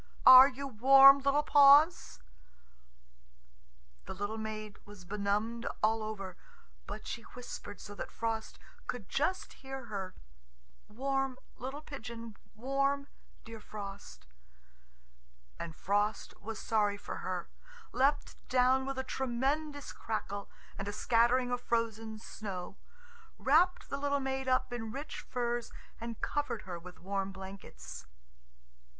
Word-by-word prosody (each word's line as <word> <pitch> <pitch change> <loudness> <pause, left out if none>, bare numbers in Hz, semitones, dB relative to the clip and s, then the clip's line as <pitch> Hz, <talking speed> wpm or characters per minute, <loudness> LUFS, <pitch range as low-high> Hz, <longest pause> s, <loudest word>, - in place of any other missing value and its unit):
Are 255 +1 +12
you 275 +1 -6
warm, 270 +3 +8
little 280 +2 +2
paws?" 290 +4 +6 1.9
The - - -6
little 205 +3 -3
maid 215 -1 -6
was 205 -3 -13
benumbed 210 +4 -1 0.2
all 220 +1 +3
over, 195 -4 -6 0.5
but - - -7
she 235 - -5
whispered 225 -5 -8
so 205 - -9
that - - -6
Frost 225 -1 -3 0.3
could 230 -7 -4
just 360 +7 -1
hear 270 -1 -7
her, 195 -4 -5 0.7
"Warm, 270 +2 -1 0.2
little 270 +4 -6
pigeon, 230 -6 -8 0.2
warm, 275 +4 0 0.4
dear 225 -1 -9
Frost," 200 - -9 1.3
And 165 -2 -6
Frost 205 +4 0
was 220 +1 -5
sorry 210 -2 +1
for - - -6
her, 180 -2 -3 0.4
leapt 280 +3 +1
down 260 +1 +3
with 270 -1 -3
a 260 - -1
tremendous 270 +4 -2
crackle 205 -2 -4 0.3
and 195 - -4
a - - -1
scattering 245 +3 +3
of 245 0 -1
frozen 225 -2 -1
snow, 195 -4 -7 0.6
wrapped 335 +7 +3
the 275 - -2
little 285 0 +1
maid 265 0 -3
up 255 -1 +1
in 225 -2 -4
rich 280 +5 -6
furs, 240 -2 -2 0.3
and 230 -1 -6
covered 290 -7 -2
her 180 -2 -6
with 180 +1 -12
warm 195 +1 -2
blankets. 190 - -10
235 Hz, 125 wpm, -32 LUFS, 205-270 Hz, 1.9 s, Are